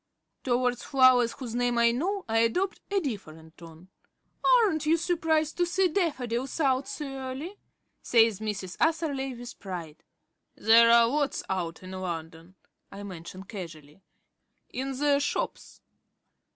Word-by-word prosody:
Towards 245 Hz, -1 st, 0 dB
flowers 255 Hz, -3 st, +4 dB
whose 245 Hz, -5 st, -7 dB
names 245 Hz, 0 st, 0 dB
I 235 Hz, 0 st, +5 dB
know 375 Hz, +11 st, -2 dB
I 225 Hz, 0 st, +2 dB
adopt 360 Hz, +13 st, 0 dB
a 400 Hz, -1 st, +2 dB
different 160 Hz, -, -7 dB
tone. 165 Hz, +1 st, -14 dB, 0.5 s
"Aren't 415 Hz, -12 st, +3 dB
you 325 Hz, +2 st, +4 dB
surprised 320 Hz, -2 st, 0 dB
to 350 Hz, -, +2 dB
see 365 Hz, +1 st, +2 dB
daffodils 270 Hz, -, -2 dB
out 270 Hz, -3 st, +1 dB
so 300 Hz, -, -5 dB
early?" 270 Hz, +7 st, -6 dB, 0.4 s
says 225 Hz, -4 st, +3 dB
Mrs. 200 Hz, -4 st, -5 dB
Atherley 285 Hz, -5 st, 0 dB
with 240 Hz, 0 st, -10 dB
pride. 175 Hz, -6 st, -7 dB, 0.5 s
"There 230 Hz, +1 st, +6 dB
are 235 Hz, 0 st, +6 dB
lots 285 Hz, +2 st, -1 dB
out 175 Hz, -2 st, -3 dB
in 185 Hz, -, -9 dB
London," 170 Hz, -1 st, -6 dB, 0.4 s
I 200 Hz, +1 st, -8 dB
mention 185 Hz, -1 st, -9 dB
casually. 170 Hz, -5 st, -10 dB, 0.7 s
"In 265 Hz, +1 st, -4 dB
the 285 Hz, 0 st, +3 dB
shops." 290 Hz, -, -3 dB
245 Hz, 135 wpm, -28 LUFS, 190-295 Hz, 0.7 s, There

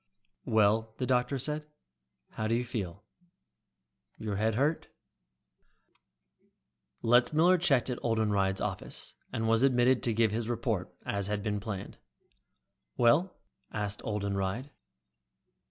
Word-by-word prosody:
"Well," 110 Hz, +1 st, +2 dB
the 130 Hz, -, -1 dB
doctor 125 Hz, +1 st, +1 dB
said, 150 Hz, +3 st, -2 dB, 0.6 s
"how 110 Hz, -, -3 dB
do 115 Hz, -, +2 dB
you 125 Hz, +1 st, -1 dB
feel? 100 Hz, -5 st, -5 dB, 1.1 s
Your 105 Hz, -2 st, -3 dB
head 110 Hz, +1 st, +1 dB
hurt?" 145 Hz, +6 st, +1 dB, 2.2 s
Letzmiller 150 Hz, +10 st, +4 dB
checked 140 Hz, -7 st, +3 dB
at 125 Hz, -2 st, -3 dB
Oldenreid's 105 Hz, -4 st, +1 dB
office, -, -, -3 dB, 0.2 s
and 115 Hz, 0 st, -1 dB
was 115 Hz, +1 st, +3 dB
admitted 130 Hz, -1 st, +4 dB
to 115 Hz, -, +1 dB
give 110 Hz, -2 st, +3 dB
his 115 Hz, +1 st, -2 dB
report, 115 Hz, -5 st, -1 dB
as 100 Hz, -1 st, -1 dB
had 105 Hz, -1 st, -2 dB
been 105 Hz, -1 st, -1 dB
planned. 100 Hz, -2 st, -6 dB, 1.0 s
"Well?" 150 Hz, +11 st, +3 dB, 0.3 s
asked 105 Hz, -1 st, -3 dB
Oldenreid. 100 Hz, +4 st, -2 dB
115 Hz, 115 wpm, -30 LUFS, 105-125 Hz, 2.2 s, Letzmiller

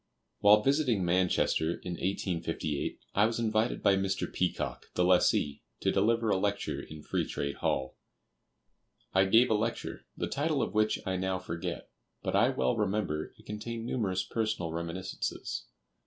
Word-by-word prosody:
While 105 Hz, +1 st, +6 dB
visiting 135 Hz, -, +2 dB
Manchester, 85 Hz, -2 st, +2 dB
in 90 Hz, -, -7 dB
1858, 85 Hz, -5 st, -2 dB
I 105 Hz, +2 st, +4 dB
was 115 Hz, -, -2 dB
invited 110 Hz, 0 st, +1 dB
by 100 Hz, -, +5 dB
Mr. 95 Hz, 0 st, 0 dB
Peacock, -, -, -2 dB
the 90 Hz, -, +3 dB
lessee, 90 Hz, -5 st, +3 dB, 0.2 s
to -, -, +2 dB
deliver 115 Hz, 0 st, +2 dB
a -, -, +3 dB
lecture 100 Hz, +1 st, -1 dB
in 75 Hz, -1 st, -10 dB
"Free -, -, 0 dB
Trade 70 Hz, 0 st, -3 dB
Hall." 65 Hz, 0 st, -1 dB, 1.2 s
I 95 Hz, 0 st, +5 dB
gave 115 Hz, +5 st, +5 dB
a -, -, +6 dB
lecture, 110 Hz, +2 st, -2 dB
the -, -, -1 dB
title 150 Hz, 0 st, 0 dB
of -, -, -3 dB
which 110 Hz, 0 st, +2 dB
I 95 Hz, 0 st, -1 dB
now 95 Hz, 0 st, 0 dB
forget; 85 Hz, -2 st, -5 dB, 0.3 s
but -, -, -1 dB
I -, -, +5 dB
well 65 Hz, -1 st, +1 dB
remember 100 Hz, -7 st, -1 dB
it -, -, -19 dB
contained 115 Hz, +2 st, -5 dB
numerous 95 Hz, -7 st, 0 dB
personal 110 Hz, -7 st, -2 dB
reminiscences. 85 Hz, +2 st, -4 dB
95 Hz, 155 wpm, -30 LUFS, 90-110 Hz, 1.2 s, While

